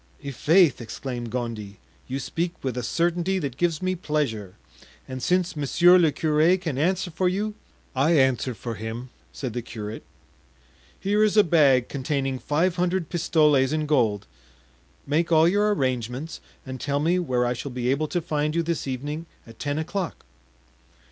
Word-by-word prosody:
"I'faith!" 150 +2 +3
exclaimed 120 +1 -5
Gondy, 110 -4 -4 0.3
"you 130 - -3
speak 170 +5 -2
with 130 -3 -2
a 125 - -2
certainty 175 +8 0
that 140 -8 -3
gives 170 +2 0
me 185 0 +1
pleasure; 140 - -2 0.5
and 130 -1 -6
since 180 +2 +1
monsieur 175 +5 +5
le 165 -3 +4
curé 155 +5 +2
can 160 -7 -3
answer 180 +3 0
for 180 +3 +1
you——" 210 +3 -2 0.4
"I 155 +5 +3
answer 130 -2 +2
for 115 +3 -5
him," 115 +4 -6 0.2
said 130 -5 -5
the 120 - -2
curate. 110 -2 -7 1.0
"Here 205 +2 +2
is 215 0 +2
a 210 - +8
bag 140 -8 +4
containing 135 -1 -2
five 170 +7 0
hundred 180 -2 0
pistoles 150 -5 +3
in 155 0 0
gold; 115 -9 +1 0.8
make 160 +4 0
all 160 0 +6
your 205 +3 +3
arrangements, 130 - -2 0.2
and 130 -1 -7
tell 140 0 0
me 170 +5 +2
where 125 -8 0
I 120 - +1
shall 130 +3 -6
be 125 -1 -2
able 145 +4 +1
to 175 +3 -1
find 150 -1 -1
you 170 - +2
this 165 -3 -2
evening 145 +5 -4 0.2
at 115 -1 -15
ten 145 0 -2
o'clock." 170 +2 -4
150 Hz, 165 wpm, -25 LUFS, 125-170 Hz, 1.0 s, a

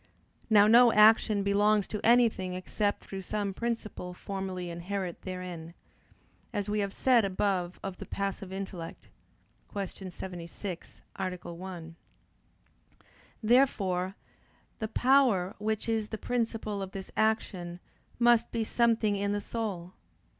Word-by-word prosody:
Now 205 -2 +7
no 235 +2 +7
action 215 -1 +5
belongs 205 +1 +3
to 210 - -4
anything 225 -6 +3
except 205 +3 -1
through 195 -1 -6
some 200 +1 -2
principle 215 -5 -4
formally 185 -2 -4
inherent 180 +1 -4
therein; 180 -3 -6 0.8
as 205 -3 -2
we 210 0 0
have 200 -1 -1
said 245 +1 +4
above 185 -2 -1
of 190 -2 -5
the - - -8
passive 195 -1 -3
intellect 190 -3 -7 0.6
(Q. 195 -1 -5
76, 180 0 -7
A. 180 -2 -4
1). 170 -2 -8 1.5
Therefore 195 -6 +2 0.6
the 220 - -2
power 235 -6 +3
which 215 +1 -2
is 220 -2 0
the 220 - -4
principle 225 -3 -2
of 190 0 -6
this 195 -1 -7
action 185 -5 0 0.4
must 240 -1 +4
be 230 - 0
something 225 -2 +2
in 200 0 0
the 205 - 0
soul. 200 -5 -4
200 Hz, 125 wpm, -30 LUFS, 185-220 Hz, 1.5 s, Now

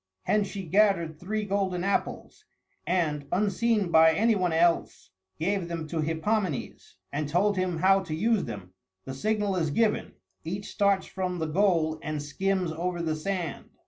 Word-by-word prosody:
Hence 210 -1 +1
she 195 0 -6
gathered 170 -3 +2
three 215 +4 -2
golden 190 -3 -1
apples, 200 +1 -2 0.4
and, 155 -5 0
unseen 205 0 +1
by 160 0 +6
any 225 +4 +3
one 185 -4 0
else, 165 - +1 0.3
gave 185 +2 -1
them 165 -2 -4
to 160 -1 -1
Hippomenes, 165 - -2 0.2
and 145 0 -2
told 200 +6 +2
him 185 -2 -1
how 190 +3 +4
to 155 - -3
use 220 +4 +1
them. 100 -6 -8 0.3
The 130 - -5
signal 205 +6 0
is 160 -3 0
given; 215 +8 0 0.3
each 195 +5 -5
starts 200 -1 +2
from 185 -1 -3
the 160 - -2
goal 160 -2 +1
and 155 -1 -3
skims 180 +4 -1
over 175 +2 -3
the 160 -2 -1
sand. 175 -1 -4
180 Hz, 160 wpm, -27 LUFS, 160-200 Hz, 0.4 s, by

